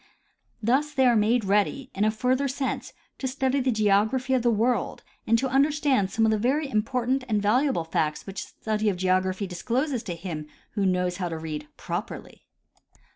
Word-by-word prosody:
Thus 285 Hz, +6 st, +1 dB
are 255 Hz, -3 st, +5 dB
the}^ -, -, +4 dB
made 220 Hz, +1 st, +2 dB
ready, 210 Hz, +7 st, +1 dB
in 200 Hz, +2 st, +1 dB
a -, -, +4 dB
further 255 Hz, +5 st, +1 dB
sense, 270 Hz, 0 st, -3 dB, 0.3 s
to 265 Hz, -, -2 dB
study 265 Hz, +1 st, 0 dB
the 260 Hz, 0 st, +1 dB
geography 220 Hz, +4 st, +2 dB
of 255 Hz, -, +3 dB
the 240 Hz, -, +2 dB
world 235 Hz, +3 st, 0 dB, 0.2 s
and 230 Hz, -, +4 dB
to 265 Hz, -, 0 dB
understand 275 Hz, -5 st, +2 dB
some 225 Hz, +3 st, +1 dB
of 220 Hz, -, +3 dB
the 215 Hz, -, +1 dB
very 275 Hz, +7 st, +1 dB
im 215 Hz, -5 st, +1 dB
portant 255 Hz, +3 st, -1 dB
and 215 Hz, -2 st, +2 dB
valuable 235 Hz, -, +2 dB
facts 155 Hz, -1 st, -1 dB
which 195 Hz, 0 st, -5 dB
the -, -, -23 dB
study 215 Hz, -1 st, +1 dB
of 190 Hz, -, -2 dB
geography 185 Hz, +1 st, +1 dB
dis 180 Hz, -2 st, -7 dB
closes 255 Hz, +1 st, 0 dB
to 190 Hz, -7 st, -5 dB
him 165 Hz, -3 st, -6 dB, 0.2 s
who 200 Hz, -3 st, 0 dB
knows 180 Hz, -1 st, 0 dB
how 180 Hz, -3 st, -2 dB
to 165 Hz, -, -4 dB
read 155 Hz, -2 st, -5 dB
properly. -, -, -6 dB
220 Hz, 195 wpm, -26 LUFS, 195-260 Hz, 0.3 s, are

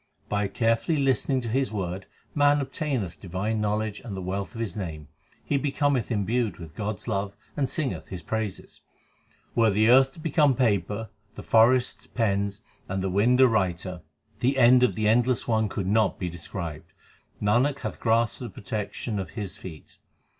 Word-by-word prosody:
By 105 Hz, -1 st, 0 dB
carefully 115 Hz, +9 st, +1 dB
listening 135 Hz, -1 st, +1 dB
to 120 Hz, -, -5 dB
His 130 Hz, +3 st, 0 dB
word 95 Hz, -2 st, -4 dB, 0.3 s
man 145 Hz, 0 st, +4 dB
obtameth 135 Hz, -, -3 dB
divine 100 Hz, +4 st, -2 dB
knowledge 105 Hz, 0 st, -1 dB
and 100 Hz, -5 st, -7 dB
the -, -, -4 dB
wealth 95 Hz, +5 st, -4 dB
of -, -, -6 dB
His 115 Hz, -3 st, -3 dB
name. 80 Hz, -7 st, -6 dB, 0.4 s
He 140 Hz, -, +1 dB
becometh 140 Hz, -3 st, 0 dB
imbued 115 Hz, +1 st, 0 dB
with 80 Hz, -3 st, -10 dB
God 105 Hz, +2 st, -3 dB
s 95 Hz, -, -13 dB
love 100 Hz, -3 st, -2 dB, 0.2 s
and 135 Hz, -3 st, 0 dB
singeth 150 Hz, -5 st, -2 dB
His 90 Hz, -3 st, -7 dB
praises. 110 Hz, 0 st, -4 dB, 0.7 s
Were 115 Hz, -1 st, +4 dB
the 110 Hz, +2 st, +3 dB
earth 135 Hz, +1 st, +6 dB
to -, -, -14 dB
become 150 Hz, -3 st, +3 dB
paper, 105 Hz, -3 st, 0 dB, 0.2 s
the -, -, -8 dB
forests 120 Hz, +3 st, +3 dB
pens, 100 Hz, -3 st, -1 dB, 0.3 s
and 95 Hz, 0 st, -2 dB
the 95 Hz, -, -1 dB
wind 120 Hz, +7 st, +4 dB
a 130 Hz, -, +8 dB
writer, 90 Hz, -5 st, -1 dB, 0.4 s
The 135 Hz, +3 st, +1 dB
end 125 Hz, 0 st, +7 dB
of 125 Hz, -, +3 dB
the 110 Hz, -1 st, 0 dB
Endless 120 Hz, +3 st, +2 dB
One 110 Hz, -2 st, +2 dB
could 95 Hz, -, -3 dB
not 105 Hz, 0 st, +2 dB
be 90 Hz, -, -3 dB
described; 85 Hz, -2 st, -7 dB, 0.5 s
Nanak 125 Hz, +7 st, +2 dB
hath -, -, -5 dB
grasped 115 Hz, 0 st, +2 dB
the 125 Hz, -, -5 dB
protection 105 Hz, +2 st, -4 dB
of 95 Hz, -4 st, -4 dB
His 100 Hz, -3 st, -4 dB
feet. 80 Hz, -5 st, -11 dB
110 Hz, 175 wpm, -26 LUFS, 95-125 Hz, 0.7 s, a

